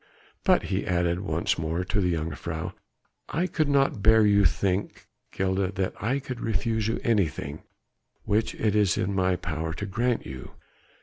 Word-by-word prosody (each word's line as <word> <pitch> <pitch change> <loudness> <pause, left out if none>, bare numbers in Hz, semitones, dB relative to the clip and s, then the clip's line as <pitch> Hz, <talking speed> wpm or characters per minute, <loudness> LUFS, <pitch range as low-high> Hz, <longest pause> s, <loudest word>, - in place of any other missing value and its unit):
But," - - +4
he 95 0 -2
added 85 -1 +1
once 85 -3 -1
more 80 +3 -1
to 95 +3 0
the 90 -2 +1
jongejuffrouw, 80 0 -4 0.6
"I 170 - 0
could 155 -5 0
not 135 -6 +2
bear 110 +1 +6
you 100 -1 +4
to - - +7
think, 95 +2 -2 0.3
Gilda, 95 0 0
that 95 0 -1
I 125 +6 +1
could 130 -3 -6
refuse 110 0 0
you 115 - -1
anything 80 - 0 0.6
which 110 +2 0
it 105 -2 0
is 105 -4 +3
in 100 +2 0
my 95 -1 +2
power 80 -2 -3
to 105 - -4
grant 120 +5 0
you. 65 -1 -9
95 Hz, 170 wpm, -27 LUFS, 85-110 Hz, 0.6 s, to